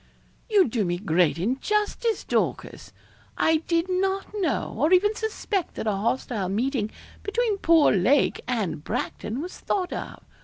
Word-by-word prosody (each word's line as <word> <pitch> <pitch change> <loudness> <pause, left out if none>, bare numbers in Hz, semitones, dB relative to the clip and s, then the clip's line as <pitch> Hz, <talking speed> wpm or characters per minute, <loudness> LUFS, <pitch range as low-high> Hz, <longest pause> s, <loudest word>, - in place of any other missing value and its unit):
'You 410 -6 +5
do 225 -2 0
me 175 -1 -1
great 175 -5 +2
injustice, 415 - 0
Dorcas. - - -2 0.5
I 320 0 +3
did 335 +1 0
not 385 +2 -1
know, 375 -9 -1
or 295 +9 +1
even 415 +4 +4
suspect 425 -4 -3
that - - -4
a 215 - +2
hostile 210 -1 -1
meeting 225 +2 0 0.3
between 420 -1 0
poor 330 -4 +5
Lake 240 +10 +3
and 215 -11 -2
Bracton 240 - -3
was 360 - -8
thought 370 -3 -1
of. - - -7
305 Hz, 145 wpm, -25 LUFS, -, 0.5 s, You